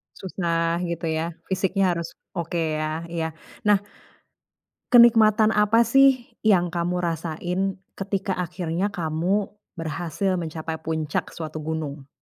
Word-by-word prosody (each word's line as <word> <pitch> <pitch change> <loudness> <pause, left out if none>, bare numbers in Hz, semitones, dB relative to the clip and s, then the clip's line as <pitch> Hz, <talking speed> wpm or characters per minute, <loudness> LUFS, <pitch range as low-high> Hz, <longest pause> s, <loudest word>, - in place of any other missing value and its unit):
Susah 170 -3 -1
gitu 170 -1 -3
ya, 160 +2 -1 0.2
fisiknya 190 0 +1
harus 170 -1 -5 0.2
oke 165 -2 -1
ya, 155 +1 -2
iya. 165 -1 -3 0.3
Nah, 205 -2 +5 1.1
kenikmatan 220 -2 +6
apa 210 +2 +4
sih 270 0 +4 0.2
yang 180 -5 +4
kamu 175 +1 -1
rasain, 170 +2 -2 0.4
ketika 195 0 -2
akhirnya 175 +1 -1
kamu 175 +3 -1 0.2
berhasil 175 +3 -2
mencapai 160 -1 -4
puncak 160 -2 -2
suatu 155 -1 -5
gunung? 155 -3 -4
170 Hz, 115 wpm, -24 LUFS, 160-195 Hz, 1.1 s, kenikmatan